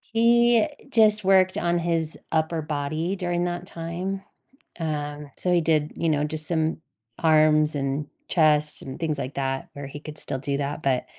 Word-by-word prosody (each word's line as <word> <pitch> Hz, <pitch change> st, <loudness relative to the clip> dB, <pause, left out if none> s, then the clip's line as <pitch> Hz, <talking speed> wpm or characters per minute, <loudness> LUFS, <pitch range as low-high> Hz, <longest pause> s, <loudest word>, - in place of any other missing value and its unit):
He 235 Hz, 0 st, +4 dB, 0.2 s
just 215 Hz, -4 st, +4 dB
worked 185 Hz, -1 st, +4 dB
on 175 Hz, 0 st, +1 dB
his 165 Hz, -2 st, 0 dB
upper 160 Hz, 0 st, 0 dB
body 155 Hz, +4 st, -2 dB
during 175 Hz, -2 st, -1 dB
that 175 Hz, 0 st, -3 dB
time. 175 Hz, +4 st, -4 dB, 0.6 s
Um, 150 Hz, -2 st, -4 dB
so 180 Hz, -, +1 dB
he 175 Hz, -, +4 dB
did, 155 Hz, -2 st, +1 dB
you 165 Hz, -, -1 dB
know, 150 Hz, -2 st, +1 dB
just 155 Hz, 0 st, -1 dB
some 160 Hz, -2 st, 0 dB, 0.4 s
arms 155 Hz, -1 st, +4 dB
and 140 Hz, +1 st, -2 dB, 0.2 s
chest 150 Hz, -2 st, +3 dB
and 130 Hz, 0 st, -8 dB
things 155 Hz, -3 st, 0 dB
like 135 Hz, +1 st, -4 dB
that 135 Hz, -1 st, -2 dB
where 140 Hz, -1 st, -7 dB
he 145 Hz, +2 st, -8 dB
could 155 Hz, 0 st, -9 dB
still -, -, 0 dB
do 140 Hz, +1 st, -2 dB
that, 145 Hz, +2 st, -3 dB
but 130 Hz, -2 st, +1 dB
155 Hz, 170 wpm, -25 LUFS, 145-175 Hz, 0.6 s, He